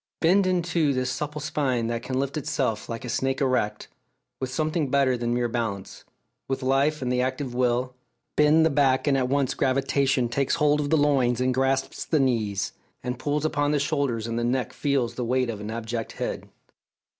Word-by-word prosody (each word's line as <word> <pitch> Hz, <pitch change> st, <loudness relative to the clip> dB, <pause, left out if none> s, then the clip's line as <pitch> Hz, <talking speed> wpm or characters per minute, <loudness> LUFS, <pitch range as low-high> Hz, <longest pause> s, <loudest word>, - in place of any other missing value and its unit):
Bend 185 Hz, +3 st, +4 dB
in 180 Hz, -2 st, +1 dB
two 165 Hz, -4 st, +1 dB
this 130 Hz, 0 st, 0 dB
supple 150 Hz, +3 st, -4 dB
spine 140 Hz, -5 st, -1 dB
that 115 Hz, 0 st, -2 dB
can 130 Hz, +1 st, -2 dB
lift 140 Hz, +2 st, -2 dB
itself, 135 Hz, -7 st, -2 dB
like 115 Hz, +1 st, -5 dB
a -, -, -5 dB
snake 135 Hz, +2 st, -1 dB
erect, 125 Hz, -6 st, 0 dB, 0.5 s
with 130 Hz, -, -3 dB
something 155 Hz, +2 st, -1 dB
better 135 Hz, -2 st, +3 dB
than 120 Hz, -1 st, -2 dB
mere 120 Hz, 0 st, +1 dB
balance 115 Hz, -5 st, -4 dB, 0.4 s
with 135 Hz, 0 st, -2 dB
life 135 Hz, +3 st, +2 dB
and 125 Hz, -, -1 dB
the 125 Hz, 0 st, +2 dB
active 130 Hz, 0 st, -2 dB
will; 125 Hz, 0 st, 0 dB, 0.4 s
bend 150 Hz, +2 st, +5 dB
the 160 Hz, -, +3 dB
back, 135 Hz, -2 st, +2 dB
and 145 Hz, -2 st, +3 dB
at 130 Hz, -2 st, +1 dB
once 140 Hz, -1 st, +1 dB
gravitation 135 Hz, -1 st, +1 dB
takes 135 Hz, +5 st, 0 dB
hold 150 Hz, -2 st, +3 dB
of 145 Hz, -1 st, -1 dB
the 160 Hz, -, +4 dB
loins 135 Hz, -5 st, +2 dB
and 130 Hz, 0 st, +1 dB
grasps 135 Hz, +1 st, 0 dB
the 155 Hz, -, +1 dB
knees, 110 Hz, -7 st, 0 dB, 0.3 s
and 125 Hz, 0 st, -3 dB
pulls 145 Hz, +2 st, -1 dB
upon 145 Hz, -1 st, +1 dB
the 145 Hz, -, +2 dB
shoulders, 140 Hz, -6 st, -1 dB
and 115 Hz, 0 st, -2 dB
the -, -, -1 dB
neck 125 Hz, +1 st, -1 dB
feels 140 Hz, -5 st, 0 dB
the 125 Hz, -, -3 dB
weight 125 Hz, 0 st, +1 dB
of 105 Hz, -2 st, -7 dB
an 105 Hz, -, -5 dB
abject 115 Hz, 0 st, -4 dB
head. -, -, -4 dB
130 Hz, 200 wpm, -25 LUFS, 120-145 Hz, 0.5 s, bend